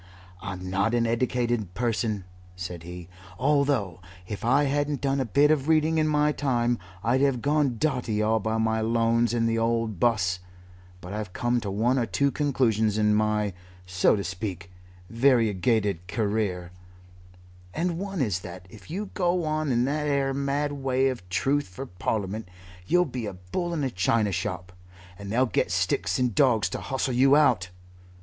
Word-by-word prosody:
"I'm 95 0 -6
not 100 +5 +1
an 120 -1 +2
eddicated 120 -4 -1
person," 115 -4 -1 0.3
said 90 -2 -6
he, 90 +1 -9 0.3
"although 135 - +1 0.3
if 105 -1 -6
I 135 +5 +3
hadn't 145 0 0
done 140 0 0
a 130 - 0
bit 140 +6 +4
of 150 -2 +1
reading 160 0 +3
in 155 - +2
my 150 0 +2
time 120 -5 0 0.2
I'd 125 +3 +2
have 135 -3 +2
gone 145 -3 +1
dotty 125 -6 -1
all 110 +1 +2
by 110 +1 -1
my 110 0 +1
lones 115 0 +2
in 115 -1 +1
the 115 0 +1
old 115 -4 0
'bus, 90 -6 +2 0.6
but 90 +3 -8
I've 105 -3 -5
come 120 0 0
to 100 - -4
one 115 +7 +1
or 115 - 0
two 140 +4 +1
conclusions 115 -8 +1
in 105 0 +3
my, 105 -1 +1 0.3
so 90 +3 +3
to 100 - -3
speak, 90 -1 -5 0.4
variegated 110 -6 +2
career, 100 -4 -1 1.0
and 170 - -2
one 195 -4 -3
is 100 -7 -1
that 90 0 -9
if 105 +4 -14
you 195 +5 -4
go 175 -2 +1
on 155 -2 -1
in 120 0 +2
that 150 +2 -1
'ere 140 -1 +1
mad 140 +1 -1
way 135 -1 +1
for 125 - -12
Truth 135 +2 -1
in 135 - -4
Parliament, 105 -1 -2 0.4
you'll 180 - +4
be 125 -6 -5
a 100 - -5
bull 90 - -4
in 160 -4 -2
a 130 - -1
china 105 +3 +1
shop, 90 -1 -4 0.5
and 100 0 -7
they'll 125 +4 +3
get 110 - 0
sticks 85 +1 0
and 125 -3 +1
dawgs 110 -6 +3
to - - -5
hustle 130 -1 -2
you 135 +3 +5
out. 125 -12 +3
115 Hz, 170 wpm, -26 LUFS, 100-140 Hz, 1.0 s, you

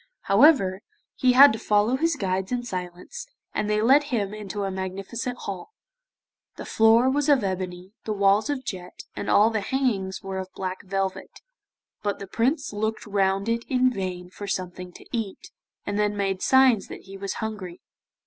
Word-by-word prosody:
However, 200 -4 +4 0.3
he 255 -1 +3
had 275 0 +9
to 220 - -5
follow 210 +4 +2
his 330 +3 +1
guides 190 -4 -2
in 245 -1 -1
silence, 180 - -6 0.3
and 210 - -1
they 210 0 +1
led 275 +5 +5
him 210 -7 -2
into 205 -1 -5
a 195 - -2
magnificent 195 +6 -4
hall; 200 - -7 0.8
the - - -8
floor 225 +3 +4
was 285 +3 +1
of 275 -6 +4
ebony, 185 -1 -4
the 220 - -2
walls 200 +4 +3
of 275 -2 -3
jet, 180 -2 -7
and - - -4
all 215 +2 +5
the 220 -2 -1
hangings 200 -6 -1
were 190 -1 -4
of 190 0 -7
black 185 -1 -4
velvet, 195 0 -4 0.6
but 205 -1 -2
the 195 - -7
Prince 255 - -1
looked 220 +2 -2
round 195 -1 0
it 230 0 0
in 255 -1 +3
vain 180 -4 -5
for 205 +2 -8
something 180 -1 -4
to - - -14
eat, 220 -4 -5 0.3
and 205 0 -2
then 210 0 0
made 195 -2 -1
signs 260 -6 +4
that - - -9
he 195 0 -12
was 195 0 -4
hungry. 205 -6 -6
205 Hz, 175 wpm, -25 LUFS, 190-240 Hz, 0.8 s, had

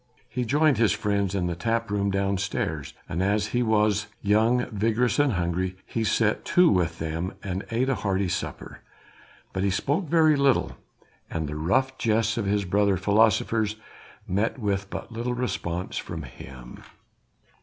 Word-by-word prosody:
He 125 -1 -3
joined 145 0 +3
his 110 -4 +4
friends 100 -2 0
in 90 -2 0
the 90 -1 -2
tap 115 +5 -1
room 100 -1 +1
downstairs, 95 -7 -2
and 85 - -2
as 100 +2 +1
he 120 - 0
was 105 -2 +2 0.2
young, 110 +4 +3
vigorous 115 +5 +1
and 145 -4 +3
hungry 90 +1 -1
he 115 - -2
set 110 0 +1
to 180 -1 +5
with 85 -3 +1
them 80 +3 -3
and 95 -1 -4
ate 120 +3 0
a 135 - +2
hearty 100 -4 0
supper. - - -5 0.7
But 95 - -2
he 100 - +2
spoke 145 - 0
very 160 -2 +5
little 140 -2 +2 0.5
and 80 -2 -3
the 75 - -5
rough 130 - 0
jests 115 0 +1
of 110 -4 -2
his 100 0 +1
brother 100 +1 +2
philosophers 105 +2 +2 0.5
met 100 +6 0
with 100 -4 -2
but 110 - -6
little 120 +2 -2
response 95 -7 -3
from 80 -2 -6
him. 60 -1 -11
105 Hz, 160 wpm, -26 LUFS, 95-115 Hz, 0.7 s, to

